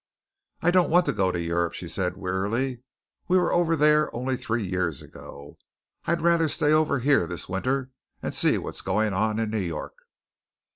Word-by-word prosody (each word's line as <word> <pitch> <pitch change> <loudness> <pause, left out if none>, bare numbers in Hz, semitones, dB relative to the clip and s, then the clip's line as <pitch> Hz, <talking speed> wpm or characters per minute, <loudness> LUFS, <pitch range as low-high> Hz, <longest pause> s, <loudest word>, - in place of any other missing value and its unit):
"I 175 - +4
don't 180 -1 +3
want 175 +2 +4
to - - 0
go 95 -3 +1
to 85 - -3
Europe," 85 0 -1
she 90 - -6
said 90 +1 -2
warily. 105 +7 -2 0.5
"We 185 - +4
were 180 -1 +2
over 170 -1 +2
there 150 0 +4
only 130 +2 -1
three 115 -3 -2
years 90 -5 -2
ago. 70 +1 -12 0.5
I'd 170 0 0
rather 170 -1 +3
stay 150 +1 +1
over 155 -2 +3
here 135 -8 +2
this 85 0 -6
winter 130 +8 -2 0.3
and - - -4
see - - +2
what's - - -5
going 105 -1 0
on 110 +3 0
in 110 -1 -1
New 110 - -1
York." 85 -5 -4
115 Hz, 185 wpm, -25 LUFS, 95-150 Hz, 0.5 s, I